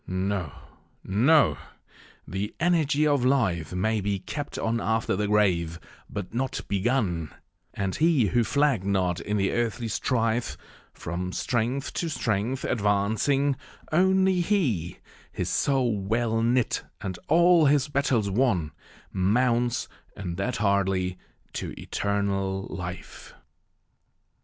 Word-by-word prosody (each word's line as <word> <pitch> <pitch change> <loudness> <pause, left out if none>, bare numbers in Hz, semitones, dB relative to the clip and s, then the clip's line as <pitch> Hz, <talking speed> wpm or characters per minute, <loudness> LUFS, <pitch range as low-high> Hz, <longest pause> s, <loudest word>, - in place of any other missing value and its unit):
No, 95 -3 -2 0.5
no! 135 +11 +3 0.7
the 95 +3 -4
energy 155 -3 +2
of 145 -4 +2
life 115 - +1
may 105 +4 0
be 100 0 -1
Kept 140 +10 -6
on 115 +1 -1
after 110 -2 0
the 105 +2 -1
grave, 90 -6 +1 0.3
but 100 -1 -6
not 130 +2 -2
begun; 100 - 0 0.4
And 95 -1 -2
he 155 -7 +3
who 120 +3 +2
flagg'd 140 -5 +2
not 95 -3 0
in 105 0 -2
the 95 -1 +1
earthly 120 0 -1
strife, 115 +1 0 0.3
From 90 +2 -5
strength 125 +7 -1
to 170 - -2
strength 120 -2 -1
advancing 110 +7 +1 0.4
only 190 +2 +3
he, 140 - 0 0.3
His - - -3
soul 125 -6 +1
well 115 +3 0
knit, 120 +1 +1 0.2
and 95 -2 -5
all 170 0 +5
his 140 0 +3
battles 135 -7 +1
won, 100 - +1 0.4
Mounts, 120 +5 +1 0.3
and 90 -4 -4
that 125 +6 -1
hardly, 95 -3 0 0.3
to - - -5
eternal 100 -1 -1
life. 90 -1 -8
110 Hz, 120 wpm, -26 LUFS, 95-135 Hz, 0.7 s, all